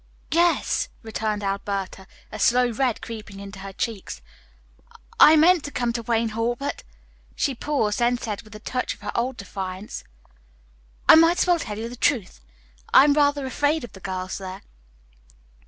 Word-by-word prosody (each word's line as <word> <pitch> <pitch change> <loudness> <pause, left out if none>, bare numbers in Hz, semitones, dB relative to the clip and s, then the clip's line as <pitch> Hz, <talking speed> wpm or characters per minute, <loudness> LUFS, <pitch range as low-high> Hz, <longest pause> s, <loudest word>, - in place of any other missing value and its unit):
"Yes," 340 +1 +2
returned 215 -1 -3
Alberta, 195 -1 -3 0.2
a - - -7
slow 245 0 +3
red 245 0 -1
creeping 215 -3 -8
into 200 0 -9
her 195 0 -7
cheeks. 210 0 -4 1.0
"I 310 - +9
meant 330 +1 +5
to 285 - -6
come 240 -3 -1
to 235 - -2
Wayne 230 0 0
Hall, 230 +2 -1
but 280 +3 -4 0.3
" - - -32
She 280 - 0
paused, 245 -5 -1
then 240 +1 +2
said 215 -4 -5
with 215 -1 -15
a - - -8
touch 250 +3 -3
of - - -25
her - - -4
old 245 +2 -1
defiance, 195 0 -6 1.0
"I - - +10
might 330 +2 +6
as - - +2
well 350 -2 +3
tell 210 -8 -5
you 225 +1 -4
the 240 - -8
truth, 230 - 0 0.5
I - - +8
am 290 0 +4
rather 285 -1 +2
afraid 290 +3 0
of 240 - -8
the 190 - -11
girls 185 0 -4
there." 190 0 -8
230 Hz, 175 wpm, -24 LUFS, 200-280 Hz, 1.0 s, I